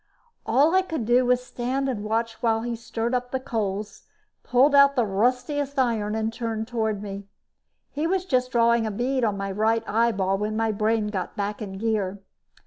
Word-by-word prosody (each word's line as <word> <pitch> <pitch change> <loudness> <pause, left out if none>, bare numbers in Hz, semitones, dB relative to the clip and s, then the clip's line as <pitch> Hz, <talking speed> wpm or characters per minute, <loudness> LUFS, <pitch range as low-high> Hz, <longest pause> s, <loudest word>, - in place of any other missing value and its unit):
All 295 +5 +4
I 375 - +5
could 320 -10 -4
do 245 +2 +3
was 250 0 +2
stand 255 +3 -2
and 230 -6 -3
watch 225 +1 -1
as 225 0 +1
he 240 -1 -2
stirred 230 +1 -3
up 250 0 -1
the 260 - -2
coals, 210 -5 -4 0.3
pulled 265 +4 +3
out 280 0 +6
the 245 -3 +2
ruddiest 250 +7 0
iron 225 -5 +1
and 220 0 -1
turned 225 -2 -3
toward 220 -4 -2
me. 200 -1 -7 0.6
He 300 +3 -1
was 370 +1 0
just 255 -6 0
drawing 235 -1 +3
a - - -2
bead 250 +5 -1
on 210 -3 +1
my 195 0 -3
right 220 +3 +1
eyeball 200 -4 +1
when 215 +1 -2
my 225 0 +1
brain 215 +1 0
got 190 -4 -4
back 205 +1 -3
in 195 -2 -6
gear. 205 -2 -1
230 Hz, 190 wpm, -25 LUFS, 210-250 Hz, 0.6 s, out